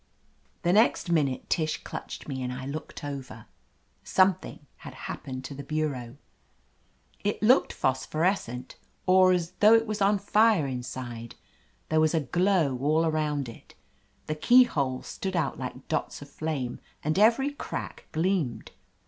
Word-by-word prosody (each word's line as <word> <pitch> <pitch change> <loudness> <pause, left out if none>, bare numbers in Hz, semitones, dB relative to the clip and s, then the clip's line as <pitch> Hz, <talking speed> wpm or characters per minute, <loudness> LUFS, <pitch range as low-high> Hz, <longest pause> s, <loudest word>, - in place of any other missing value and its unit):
The 175 - +3
next 210 -4 +3
minute 145 -6 +1
Tish 155 -2 -1
clutched - - -7
me 135 -3 -4
and 125 0 -3
I 130 +1 -6
looked 150 +2 -6
over. 135 -6 -7 0.6
Something 185 -5 +1
had - - -10
happened 130 -1 -6
to - - -6
the 140 - -7
bureau. 140 -4 -3 1.1
It 205 +1 -1
looked 250 +5 +5
phosphorescent, 130 - -1 0.3
or 185 0 +6
as 175 -1 0
though 215 +2 +7
it 225 0 +3
was 215 -1 -4
on 200 +1 +4
fire 205 -3 +3
inside. 125 -2 -6 0.5
There 155 - +3
was 155 +1 +3
a - - +3
glow 165 -2 +1
all 155 +4 +2
around 150 -3 0
it. 115 - -13 0.5
The 155 - -2
keyholes 155 - +3
stood 190 -1 -4
out 170 - -1
like 130 0 -7
dots 155 - -2
of 145 - -15
flame, 140 -7 -3 0.2
and 155 +5 0
every 235 +6 +4
crack 285 - -6
gleamed. 160 - -1
155 Hz, 145 wpm, -27 LUFS, 130-190 Hz, 1.1 s, though